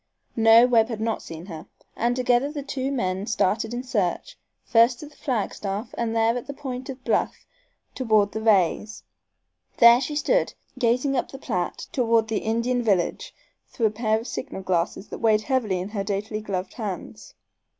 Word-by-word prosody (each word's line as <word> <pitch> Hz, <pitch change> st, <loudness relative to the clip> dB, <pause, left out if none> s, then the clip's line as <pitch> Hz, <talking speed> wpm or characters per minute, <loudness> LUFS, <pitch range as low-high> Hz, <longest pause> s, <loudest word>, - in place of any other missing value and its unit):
No, 225 Hz, +1 st, +7 dB
Webb 230 Hz, -3 st, +4 dB
had 225 Hz, -3 st, -4 dB
not 225 Hz, 0 st, -1 dB
seen 165 Hz, +1 st, -9 dB
her, 165 Hz, -5 st, -9 dB, 0.3 s
and 240 Hz, +1 st, 0 dB
together 250 Hz, +2 st, +2 dB
the 290 Hz, -2 st, -5 dB
two 270 Hz, -1 st, -3 dB, 0.4 s
started 220 Hz, 0 st, 0 dB
in 240 Hz, +1 st, -4 dB
search, 225 Hz, -, -2 dB, 0.3 s
first 235 Hz, +1 st, +4 dB
to -, -, -8 dB
the 295 Hz, -, -15 dB
flagstaff, 210 Hz, -3 st, -3 dB
and 230 Hz, -1 st, -2 dB
there 225 Hz, +1 st, +3 dB
at 245 Hz, -, -5 dB
the 280 Hz, -, -6 dB
point 260 Hz, -3 st, -6 dB
of 260 Hz, -1 st, -7 dB
bluff -, -, -1 dB, 0.5 s
beyond 215 Hz, -5 st, +2 dB
the 220 Hz, -, -4 dB
Rays', 210 Hz, 0 st, +1 dB, 0.7 s
there 235 Hz, +1 st, +8 dB
she 295 Hz, +3 st, -3 dB
stood, -, -, +1 dB, 0.2 s
gazing 250 Hz, +3 st, +1 dB
up 250 Hz, -, -1 dB
the 270 Hz, -, -9 dB
Platte 180 Hz, -10 st, -3 dB
toward 230 Hz, -3 st, +2 dB
the 220 Hz, -, 0 dB
Indian 235 Hz, +3 st, 0 dB
village 195 Hz, -7 st, 0 dB, 0.3 s
through 230 Hz, -, -1 dB
a 215 Hz, -, +3 dB
pair 220 Hz, 0 st, 0 dB
of 230 Hz, -, -9 dB
signal 190 Hz, -, -6 dB
glasses 185 Hz, +2 st, -1 dB
that -, -, -7 dB
weighed 215 Hz, -2 st, +3 dB
heavily 235 Hz, -8 st, 0 dB
in 185 Hz, +3 st, -5 dB
her 205 Hz, -2 st, -3 dB
daintily 210 Hz, +2 st, -3 dB
gloved 190 Hz, -3 st, -4 dB
hands. 180 Hz, -, -7 dB
225 Hz, 175 wpm, -24 LUFS, 205-250 Hz, 0.7 s, there